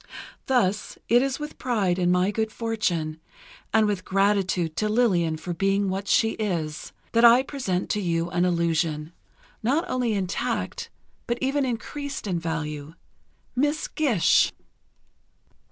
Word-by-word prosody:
Thus, 210 Hz, -6 st, +1 dB
it 240 Hz, +1 st, +6 dB
is 270 Hz, 0 st, -1 dB
with 300 Hz, 0 st, -7 dB
pride 200 Hz, -8 st, 0 dB
in 175 Hz, -1 st, +2 dB
my 180 Hz, +2 st, +2 dB
good 220 Hz, +1 st, -1 dB
fortune, 175 Hz, -10 st, -2 dB, 0.5 s
and 220 Hz, -1 st, +4 dB
with 205 Hz, -3 st, -1 dB
gratitude 190 Hz, -4 st, +1 dB
to 215 Hz, +2 st, 0 dB
Lillian 185 Hz, -9 st, +2 dB
for 175 Hz, +3 st, -5 dB
being 195 Hz, +2 st, +1 dB
what 195 Hz, +2 st, -3 dB
she 225 Hz, +2 st, +3 dB
is, 165 Hz, -8 st, -3 dB, 0.2 s
that 230 Hz, 0 st, +3 dB
I 240 Hz, +2 st, +8 dB
present 225 Hz, -11 st, -2 dB
to 210 Hz, -, 0 dB
you 170 Hz, -2 st, 0 dB
an 175 Hz, -, +1 dB
illusion, 165 Hz, -2 st, 0 dB, 0.5 s
not 280 Hz, +10 st, +1 dB
only 250 Hz, -3 st, 0 dB
intact 190 Hz, -2 st, -2 dB, 0.4 s
but 235 Hz, -, 0 dB
even 275 Hz, +1 st, +1 dB
increased 275 Hz, +3 st, -4 dB
in 180 Hz, -4 st, -1 dB
value—Miss 165 Hz, -, -4 dB
Gish! 255 Hz, -, +3 dB
200 Hz, 135 wpm, -25 LUFS, 170-235 Hz, 0.5 s, I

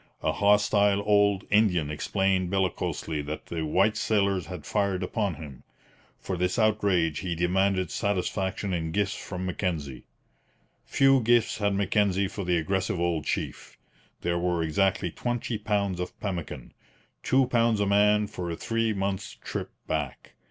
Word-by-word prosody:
A -, -, +2 dB
hostile 100 Hz, 0 st, +3 dB
old 100 Hz, -1 st, +3 dB
Indian 90 Hz, -8 st, +3 dB
explained 95 Hz, +3 st, 0 dB
bellicosely 95 Hz, -5 st, -1 dB
that 75 Hz, +1 st, -5 dB
the 80 Hz, -2 st, -4 dB
white 95 Hz, +7 st, +2 dB
sailors 100 Hz, -4 st, +1 dB
had 90 Hz, -1 st, -8 dB
fired 100 Hz, -3 st, 0 dB
upon 100 Hz, -1 st, -1 dB
him. 70 Hz, -3 st, -10 dB, 0.6 s
For 95 Hz, -, -4 dB
this 90 Hz, +3 st, -1 dB
outrage 100 Hz, -8 st, +2 dB
he 85 Hz, -1 st, -3 dB
demanded 95 Hz, +2 st, +1 dB
satisfaction 95 Hz, -1 st, -1 dB
in 80 Hz, -2 st, -2 dB
gifts 100 Hz, -1 st, +1 dB
from 90 Hz, -1 st, -6 dB
Mackenzie. 80 Hz, -8 st, -3 dB, 0.8 s
Few 135 Hz, -1 st, +4 dB
gifts 120 Hz, -1 st, +2 dB
had 100 Hz, -1 st, +1 dB
Mackenzie 100 Hz, -1 st, +1 dB
for 100 Hz, +1 st, -5 dB
the 90 Hz, -1 st, +1 dB
aggressive 95 Hz, +2 st, -1 dB
old 85 Hz, -3 st, 0 dB
chief. -, -, -4 dB, 0.4 s
There 85 Hz, 0 st, 0 dB
were 90 Hz, -1 st, 0 dB
exactly 90 Hz, +2 st, +1 dB
twenty 120 Hz, 0 st, -3 dB
pounds 100 Hz, -3 st, -1 dB
of 90 Hz, -, -5 dB
pemmican 85 Hz, -, -5 dB, 0.5 s
two 130 Hz, 0 st, +3 dB
pounds 115 Hz, -3 st, +2 dB
a 100 Hz, -, +2 dB
man 105 Hz, +1 st, +4 dB
for 90 Hz, -3 st, -5 dB
a 85 Hz, -, -3 dB
three 115 Hz, +4 st, -1 dB
months' 95 Hz, -1 st, -3 dB
trip -, -, -5 dB, 0.2 s
back. 75 Hz, -5 st, -4 dB
95 Hz, 145 wpm, -27 LUFS, 85-105 Hz, 0.8 s, Few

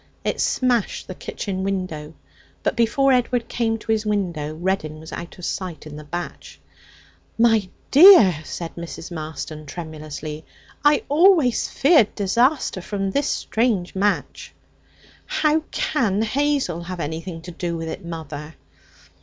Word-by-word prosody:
It -, -, -1 dB
smashed 245 Hz, -5 st, 0 dB
the 185 Hz, -, -5 dB
kitchen 190 Hz, +1 st, -5 dB
window. 185 Hz, -6 st, -3 dB, 0.5 s
But -, -, 0 dB
before 260 Hz, +4 st, +3 dB
Edward 245 Hz, -1 st, +1 dB
came 225 Hz, -1 st, 0 dB
to 225 Hz, 0 st, -4 dB
his 220 Hz, -1 st, +1 dB
window 175 Hz, -8 st, -2 dB
Reddin 160 Hz, -3 st, -2 dB
was 160 Hz, -, -11 dB
out 170 Hz, 0 st, -7 dB
of 180 Hz, -, -7 dB
sight 180 Hz, -5 st, -4 dB
in 150 Hz, -1 st, -9 dB
the 150 Hz, -, -8 dB
batch. 175 Hz, +4 st, -7 dB, 0.8 s
'My 225 Hz, -4 st, +3 dB, 0.2 s
dear,' 280 Hz, -, +9 dB
said 165 Hz, +1 st, -6 dB
Mrs. 170 Hz, 0 st, -7 dB
Marston 155 Hz, -1 st, -6 dB
tremulously, 155 Hz, -1 st, -7 dB, 0.4 s
'I 295 Hz, 0 st, +4 dB
always 310 Hz, -, +4 dB
feared 275 Hz, -, +4 dB
disaster 235 Hz, +2 st, +1 dB
from 195 Hz, +1 st, -3 dB
this 280 Hz, +7 st, 0 dB
strange 220 Hz, -6 st, 0 dB
match.' 200 Hz, +2 st, -1 dB, 0.7 s
'How 305 Hz, 0 st, +2 dB
can 220 Hz, -8 st, 0 dB
Hazel 265 Hz, -, 0 dB
have 175 Hz, +1 st, -6 dB
anything 165 Hz, +2 st, -4 dB
to 180 Hz, -, -8 dB
do 170 Hz, 0 st, -3 dB
with 165 Hz, 0 st, -5 dB
it, 160 Hz, -, -6 dB
mother?' 160 Hz, -2 st, -7 dB
190 Hz, 135 wpm, -22 LUFS, 165-235 Hz, 0.8 s, dear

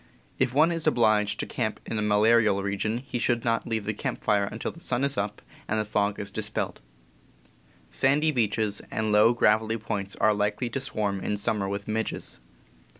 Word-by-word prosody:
If -, -, +2 dB
one 155 Hz, +6 st, +4 dB
is 165 Hz, -2 st, -2 dB
obliged 105 Hz, -6 st, +3 dB
to -, -, -3 dB
camp 110 Hz, -3 st, -3 dB
in 110 Hz, -, -2 dB
a -, -, 0 dB
malarial 105 Hz, -1 st, +3 dB
region 100 Hz, +3 st, -1 dB
he 125 Hz, -, -3 dB
should 120 Hz, -1 st, 0 dB
not 115 Hz, -1 st, 0 dB
leave 110 Hz, -2 st, -2 dB
the 105 Hz, -, -1 dB
camp -, -, -4 dB
fire 100 Hz, -1 st, +2 dB
until 110 Hz, +3 st, -4 dB
the 165 Hz, -, -15 dB
sun 135 Hz, -5 st, -1 dB
is 140 Hz, 0 st, +1 dB
up 105 Hz, 0 st, -3 dB, 0.2 s
and 110 Hz, -, 0 dB
the 110 Hz, -, -1 dB
fog 105 Hz, -1 st, 0 dB, 0.2 s
dispelled. 110 Hz, 0 st, -3 dB, 1.1 s
Sandy 140 Hz, -, +2 dB
beaches, 110 Hz, -4 st, 0 dB
and 110 Hz, -1 st, -1 dB
low, 105 Hz, +2 st, +6 dB
gravelly 110 Hz, -1 st, +2 dB
points, 100 Hz, -3 st, -4 dB
are 110 Hz, -, +3 dB
likely 105 Hz, +4 st, -1 dB
to 135 Hz, -, -2 dB
swarm 105 Hz, -6 st, -2 dB
in 105 Hz, +2 st, -2 dB
summer 100 Hz, -1 st, -1 dB
with 100 Hz, 0 st, -4 dB
midges. 110 Hz, +1 st, -3 dB
110 Hz, 185 wpm, -26 LUFS, 105-115 Hz, 1.1 s, low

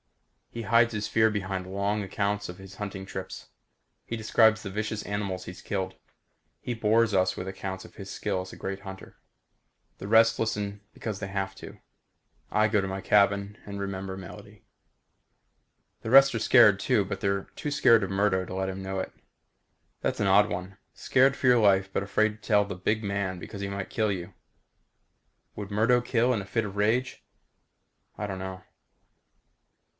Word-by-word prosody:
He 115 Hz, -, -6 dB
hides 115 Hz, +2 st, +4 dB
his 105 Hz, -1 st, -2 dB
fear 110 Hz, 0 st, +3 dB
behind 95 Hz, -3 st, -3 dB
long 100 Hz, +2 st, -1 dB
accounts 100 Hz, +1 st, -2 dB
of 90 Hz, -, -8 dB
his 95 Hz, -1 st, -12 dB
hunting 100 Hz, -1 st, -6 dB
trips. 95 Hz, -1 st, -7 dB, 0.5 s
He 115 Hz, -, -5 dB
describes 110 Hz, 0 st, +3 dB
the 100 Hz, -, -5 dB
vicious 105 Hz, +2 st, -3 dB
animals 100 Hz, -3 st, -3 dB
he's 90 Hz, -, -9 dB
killed. 95 Hz, -2 st, -3 dB, 0.6 s
He 125 Hz, -, -4 dB
bores 115 Hz, 0 st, +2 dB
us 95 Hz, -1 st, +2 dB
with 90 Hz, -, -5 dB
accounts 95 Hz, 0 st, -5 dB
of -, -, -16 dB
his -, -, -9 dB
skill 90 Hz, -, -2 dB
as 95 Hz, -, -9 dB
a -, -, -11 dB
great 95 Hz, 0 st, -4 dB
hunter. 95 Hz, -1 st, -10 dB, 0.8 s
The 100 Hz, -, -6 dB
rest 115 Hz, +1 st, +5 dB
listen 105 Hz, -2 st, -2 dB
because 105 Hz, -4 st, -5 dB
they 100 Hz, -, -4 dB
have 95 Hz, 0 st, -3 dB
to. -, -, -11 dB, 0.7 s
I 105 Hz, 0 st, +3 dB
go 105 Hz, -1 st, +2 dB
to 95 Hz, -, -3 dB
my 95 Hz, 0 st, -4 dB
cabin 100 Hz, 0 st, +2 dB
and 100 Hz, -1 st, -6 dB
remember 95 Hz, -1 st, -4 dB
Melody. 95 Hz, -, -11 dB, 1.4 s
The 110 Hz, -, -5 dB
rest 135 Hz, +1 st, +7 dB
are -, -, 0 dB
scared 105 Hz, -4 st, +6 dB
too, 115 Hz, -6 st, +2 dB
but -, -, -5 dB
they're 100 Hz, 0 st, 0 dB
too 150 Hz, -, -4 dB
scared 120 Hz, -7 st, +5 dB
of 100 Hz, -, -2 dB
Murdo 95 Hz, -1 st, +1 dB
to 90 Hz, -, -7 dB
let 95 Hz, 0 st, -1 dB
him 95 Hz, 0 st, -5 dB
know 95 Hz, 0 st, -3 dB
it. -, -, -5 dB, 0.9 s
That's -, -, -1 dB
an 100 Hz, -, +1 dB
odd 100 Hz, +2 st, +5 dB
one. 90 Hz, +2 st, -5 dB, 0.2 s
Scared 135 Hz, +1 st, +3 dB
for 130 Hz, -, 0 dB
your 125 Hz, -1 st, +6 dB
life 95 Hz, -3 st, +4 dB
but -, -, 0 dB
afraid 110 Hz, +2 st, +2 dB
to 105 Hz, -, -14 dB
tell 105 Hz, -2 st, +4 dB
the 100 Hz, -, -6 dB
big 110 Hz, +5 st, -1 dB
man 100 Hz, -2 st, -2 dB
because 100 Hz, +2 st, -8 dB
he 100 Hz, -, -3 dB
might 100 Hz, -1 st, -5 dB
kill 110 Hz, -2 st, +1 dB
you. 95 Hz, 0 st, -5 dB, 1.2 s
Would 105 Hz, -1 st, -7 dB
Murdo 115 Hz, +4 st, +3 dB
kill 120 Hz, 0 st, +2 dB
in 110 Hz, -, -1 dB
a -, -, -8 dB
fit 110 Hz, +2 st, -1 dB
of 100 Hz, -1 st, -7 dB
rage? 115 Hz, +5 st, 0 dB, 0.9 s
I 105 Hz, -, -3 dB
don't 95 Hz, -1 st, -5 dB
know. 95 Hz, 0 st, -6 dB
100 Hz, 185 wpm, -27 LUFS, 95-110 Hz, 1.4 s, rest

